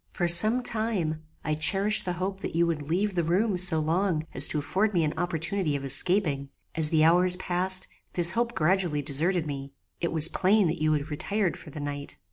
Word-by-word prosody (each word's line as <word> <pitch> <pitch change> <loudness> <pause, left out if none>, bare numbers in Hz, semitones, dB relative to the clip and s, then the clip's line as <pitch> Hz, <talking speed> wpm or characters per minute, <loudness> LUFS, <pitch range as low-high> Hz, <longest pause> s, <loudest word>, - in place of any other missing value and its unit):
For 175 - -3
some 215 +9 +5
time, 205 -10 -2 0.2
I 155 - -1
cherished 195 +7 +2
the 180 - -3
hope 190 +2 -5
that - - -6
you 170 +1 +2
would 165 -3 -3
leave 195 +5 -1
the 175 -2 -1
room 190 +6 0
so 180 -3 +5
long 165 +1 -1
as 130 +2 +4
to - - -3
afford 190 +8 -2
me 170 - +1
an 150 0 -2
opportunity 170 -1 -2
of 140 -1 -5
escaping. 140 0 0 0.2
As 160 -2 +2
the 155 -1 +1
hours 180 +2 +4
passed, 185 +1 0 0.3
this 170 -1 0
hope 235 +3 -3
gradually 170 -3 0
deserted 160 +5 -2
me. 140 -2 -7 0.3
It 170 - -3
was 160 -1 +8
plain 195 +4 +1
that 155 - -5
you 155 0 +1
had 150 +1 -4
retired 195 +5 -2
for - - -13
the 150 - -10
night. 145 0 -7
170 Hz, 205 wpm, -25 LUFS, 155-190 Hz, 0.3 s, was